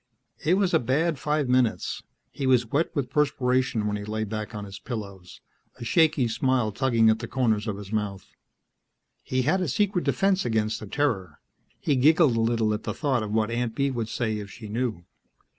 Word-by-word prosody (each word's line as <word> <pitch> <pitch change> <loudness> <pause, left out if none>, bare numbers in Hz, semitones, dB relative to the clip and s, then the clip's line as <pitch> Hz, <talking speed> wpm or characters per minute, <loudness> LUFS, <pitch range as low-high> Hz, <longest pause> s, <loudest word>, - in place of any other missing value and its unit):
It 165 +5 +3
was 195 -2 +1
a - - +5
bad 145 +6 0
five 150 -2 0
minutes; 125 -3 +1 0.3
he 135 - -3
was 125 -2 +4
wet 145 +9 0
with 135 -4 -2
perspiration 130 -5 +1
when 105 0 -1
he 105 - -6
lay 110 +1 -3
back 110 +1 -5
on 105 -1 -5
his 100 -1 -9
pillows, 100 -7 -7 0.4
a - - -6
shaky 155 -2 +3
smile 125 -1 +1
tugging 115 -1 +3
at 110 - 0
the 115 - -5
corners 115 -5 0
of 105 -2 -2
his 100 -1 -9
mouth. 100 -3 -3 0.9
He 130 0 -1
had 185 +8 +2
a 180 - 0
secret 195 - +1
defense 195 -1 +2
against 110 -2 0
the 110 - -8
Terror. 95 - -1 0.4
He 145 - +1
giggled 150 -1 +5
a 115 - +1
little 115 -1 +1
at 105 - -3
the - - -4
thought 135 -6 0
of 105 -1 -4
what 110 +1 +1
Aunt 120 -1 -2
Bee 140 0 +1
would 115 -3 -3
say 110 -4 -1
if 100 -1 -7
she 110 +2 -10
knew. 110 -6 -2
120 Hz, 200 wpm, -26 LUFS, 110-140 Hz, 0.9 s, a